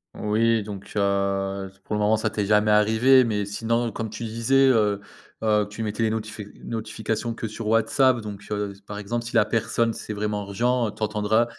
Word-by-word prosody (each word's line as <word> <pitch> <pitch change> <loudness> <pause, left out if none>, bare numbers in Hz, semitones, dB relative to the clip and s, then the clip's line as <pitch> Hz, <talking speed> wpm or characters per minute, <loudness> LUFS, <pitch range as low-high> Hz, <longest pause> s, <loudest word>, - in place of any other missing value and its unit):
Oui, 110 +1 +1
donc 100 -2 -8
heu, 100 -1 0
pour 105 - -5
le - - 0
moment, 105 +1 +3
ça - - 0
t'es 105 -2 -2
jamais 105 +1 +3
arrivé 110 +5 +5
mais 105 -3 -1
sinon 115 +3 -1
comme 110 +1 -4
tu 115 - -7
disais, 115 +5 +3
heu 105 -5 +2 0.4
heu, 105 -1 +2
tu 105 +2 -5
mettais 105 +1 -3
les 110 - +2
notifi 110 -1 -4 0.2
notifications 110 0 -3
que 115 - -4
sur 110 0 -6
WhatsApp, 120 +4 +3
donc 105 -2 -7
heu, 105 -1 -2
par 105 - -6
exemple, 115 +3 -3
si 115 - -6
la 105 - +5
personne 115 +1 0
c'est 110 - -6
vraiment 105 0 -2
urgent, 120 +3 +1
tu 110 - -6
entendras, 105 +2 +2
110 Hz, 190 wpm, -24 LUFS, 105-115 Hz, 0.4 s, arrivé